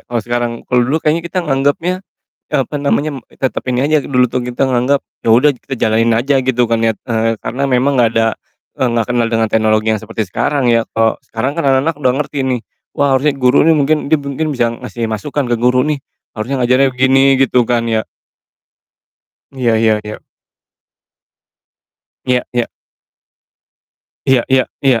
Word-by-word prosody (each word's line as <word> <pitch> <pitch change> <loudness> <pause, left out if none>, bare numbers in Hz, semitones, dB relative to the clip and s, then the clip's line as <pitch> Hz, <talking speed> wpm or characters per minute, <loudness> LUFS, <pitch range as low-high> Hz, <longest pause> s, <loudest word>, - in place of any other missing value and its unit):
kalo 120 - -1
sekarang. 120 0 -1
Kalo 125 0 +1
dulu 130 +6 +1
kayaknya 160 +1 +1
kita 180 -1 -2
nganggepnya, 145 +6 0 0.5
eee, 150 - +2
apa - - -6
namanya, 145 +1 0
m 130 - -9
tetap 130 - -3
ini 125 - 0
aja, 155 -3 +2
dulu 125 -2 +2
tuh 125 +1 -3
kita 125 +2 -1
nganggep, 130 +2 +1 0.2
yaudah 125 +5 +4
kita 130 0 -7
jalanin 115 +1 +2
aja, 125 +5 +1
gitu 125 -2 +1
kan 115 0 0
ya. 115 - +3 0.2
Eee, 115 -1 0
karena 135 +4 -4
memang, 135 +1 +2
nggak 120 -3 +4
ada, 115 -1 +1 0.4
eee, 130 - 0
nggak 115 -2 0
kenal 120 -2 +1
dengan 115 -1 +1
teknologi 110 0 +1
yang 105 - -6
seperti 110 -3 -4
sekarang 135 +7 0
ya. 115 -1 +3
Kalo 115 -1 +1 0.2
sekarang 130 +6 -2
kan 165 - -2
anak-anak 135 +4 +2
udah 130 -3 +1
ngerti 150 0 -4
nih, 130 -2 0 0.3
wah 140 -1 +2
harusnya 145 +3 +2
guru 125 +3 +4
nih 160 0 +4
mungkin 150 +2 +2
mungkin 155 - +4 0.2
mungkin 155 +1 -1
bisa 120 -4 +1 0.2
ngasih 120 -2 -4
masukan 125 +5 -3
ke 120 - +1
guru 125 +1 +3
nih, 150 -2 -1 0.4
harusnya 125 +5 -3
ngajarin 130 +2 +3
begini, 130 +1 +3 0.2
gitu 125 -2 +3
kan 115 0 0
ya. 110 -1 0 1.5
Iya 125 -4 0
ya 110 -1 +3
ya. 105 0 -8 2.0
Iya 125 -1 +2 0.2
iya. 120 - +1 1.6
Iya 130 -3 +3
iya 130 -1 +3 0.2
iya. 130 -4 +2
125 Hz, 175 wpm, -15 LUFS, 115-140 Hz, 2.0 s, yaudah